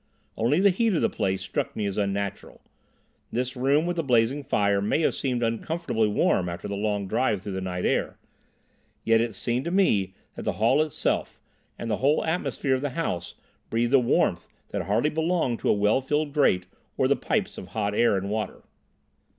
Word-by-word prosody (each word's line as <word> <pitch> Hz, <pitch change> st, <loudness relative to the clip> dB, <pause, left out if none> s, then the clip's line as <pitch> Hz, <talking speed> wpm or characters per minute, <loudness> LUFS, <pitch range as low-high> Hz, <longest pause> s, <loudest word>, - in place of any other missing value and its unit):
Only 125 Hz, +9 st, +2 dB
the 200 Hz, +1 st, +5 dB
heat 220 Hz, +2 st, +1 dB
of -, -, +1 dB
the -, -, +2 dB
place 95 Hz, -3 st, -1 dB
struck -, -, -3 dB
me 105 Hz, -, -2 dB
as 100 Hz, -1 st, -2 dB
unnatural. 100 Hz, -1 st, -3 dB, 0.7 s
This 125 Hz, +2 st, -2 dB
room 140 Hz, +5 st, +2 dB
with 175 Hz, 0 st, -2 dB
the 165 Hz, -, 0 dB
blazing 125 Hz, +1 st, +2 dB
fire 100 Hz, -7 st, +1 dB
may 105 Hz, +10 st, +1 dB
have -, -, +2 dB
seemed 125 Hz, -3 st, -1 dB
uncomfortably 115 Hz, 0 st, 0 dB
warm 95 Hz, -3 st, +1 dB
after 85 Hz, 0 st, -6 dB
the 100 Hz, -, -4 dB
long 105 Hz, -1 st, -1 dB
drive 110 Hz, -2 st, 0 dB
through 100 Hz, -, -5 dB
the 95 Hz, 0 st, -3 dB
night 90 Hz, -1 st, -3 dB
air; -, -, 0 dB, 0.9 s
yet 115 Hz, 0 st, +4 dB
it 115 Hz, -3 st, -2 dB
seemed 120 Hz, +5 st, -1 dB
to -, -, -1 dB
me 105 Hz, -, +2 dB, 0.2 s
that -, -, -6 dB
the -, -, -1 dB
hall 120 Hz, +7 st, +3 dB
itself, 155 Hz, -2 st, -1 dB, 0.4 s
and 115 Hz, -, -5 dB
the 105 Hz, -2 st, 0 dB
whole 145 Hz, +3 st, +2 dB
atmosphere 160 Hz, -4 st, -1 dB
of 130 Hz, -, 0 dB
the 145 Hz, -, -1 dB
house, 90 Hz, -, -3 dB, 0.3 s
breathed 120 Hz, +3 st, 0 dB
a 135 Hz, -, +8 dB
warmth 120 Hz, -, +1 dB, 0.2 s
that -, -, -2 dB
hardly 115 Hz, +9 st, +1 dB
belonged 160 Hz, -6 st, 0 dB
to -, -, +2 dB
well 105 Hz, +5 st, +2 dB
filled 150 Hz, +2 st, -1 dB
grates 95 Hz, -12 st, +3 dB, 0.3 s
or -, -, +3 dB
the -, -, +3 dB
pipes -, -, -2 dB
of -, -, -9 dB
hot 105 Hz, -2 st, -2 dB
air 115 Hz, -2 st, +3 dB
and 95 Hz, +1 st, -3 dB
water. 110 Hz, 0 st, -3 dB
115 Hz, 195 wpm, -26 LUFS, 100-145 Hz, 0.9 s, a